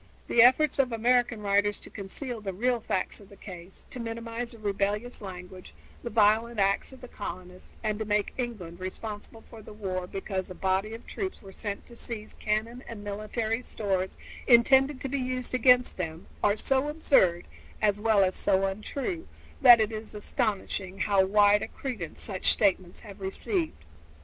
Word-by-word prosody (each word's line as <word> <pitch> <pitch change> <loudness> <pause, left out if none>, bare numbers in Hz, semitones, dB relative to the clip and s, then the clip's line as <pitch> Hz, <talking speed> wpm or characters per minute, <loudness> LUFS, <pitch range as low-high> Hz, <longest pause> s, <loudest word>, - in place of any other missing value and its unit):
The 235 - +5
efforts 260 +5 +5
of 260 -2 +3
American 240 0 +2
writers 205 +1 +2
to - - -13
conceal 225 +4 -5
the 195 -2 -4
real 240 +5 +1
facts 190 -4 -1
of 200 -2 -15
the 200 - -14
case, 185 -2 -11
to 255 - -6
minimize 230 +1 -4
the - - -11
rebellious 210 +3 -2
language, 185 - -9 0.3
the - - -4
violent 220 +1 +3
acts 195 +5 +2
of 265 - -14
the 250 - -9
colonists, 185 -4 -8
and 215 -1 -1
to 220 - -2
make 210 0 0
England 205 -9 -5
responsible 205 +4 -6
for 225 - -12
the 215 - -11
war 185 -3 -3
because 190 0 -4
a 185 - -8
body 190 +4 0
of 230 - -12
troops 380 - -5
were 195 - -11
sent 200 +1 -5
to 235 - -14
seize 225 -2 -5
cannon 225 +4 -1
and 220 -3 -8
military 215 +3 -2
stores 190 -6 -2 0.3
intended 265 +3 +6
to - - -2
be 275 +1 -2
used 255 -1 -3
against 250 0 +4
them 165 -2 -4 0.2
are 205 +1 +3
so 270 +5 +2
absurd, 230 - +3 0.3
as 205 -1 +2
well 215 -2 +4
as 185 0 +1
so 195 0 +2
untrue, 265 - -4 0.3
that 245 -4 +10
it 220 0 +1
is 220 0 -7
astonishing 200 -3 -2
how 200 -2 +4
wide 205 +1 +5
a - - -3
credence 230 - -6
such 190 -4 +2
statements 185 -3 +1
have 200 -2 -12
received. 190 - -2
210 Hz, 175 wpm, -28 LUFS, 195-235 Hz, 0.3 s, that